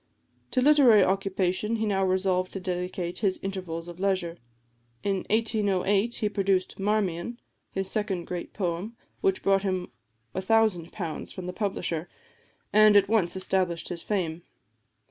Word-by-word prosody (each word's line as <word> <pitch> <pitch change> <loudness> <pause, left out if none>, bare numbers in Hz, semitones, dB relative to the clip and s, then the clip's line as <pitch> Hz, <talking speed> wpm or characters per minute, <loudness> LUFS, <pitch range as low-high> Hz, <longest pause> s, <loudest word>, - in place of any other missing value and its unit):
To 255 - +1
literary 255 -7 +6
occupation 195 +2 0
he 220 -1 -1
now 195 -2 +1
resolved 185 -1 +1
to 195 - -3
dedicate 180 -1 -3
his 195 -3 0
intervals 180 -4 -4
of 175 0 -9
leisure. 185 -3 0 0.7
In 200 -1 +1
1808 210 -1 +1
he 215 - +1
produced 195 -3 0
"Marmion," 205 +2 -1 0.3
his 195 0 -3
second 195 -4 -2
great 175 -1 -5
poem, 190 +4 -3 0.2
which 390 -1 +1
brought 195 0 +3
him 185 -2 -2 0.4
£1000 190 -4 0
from 185 - -7
the 180 - -4
publisher, 175 -5 -2 0.6
and 215 -1 +7
at 200 0 +4
once 205 -6 +2
established 185 -2 0
his 170 -2 -5
fame. 175 -5 -2
195 Hz, 135 wpm, -27 LUFS, 180-210 Hz, 0.7 s, and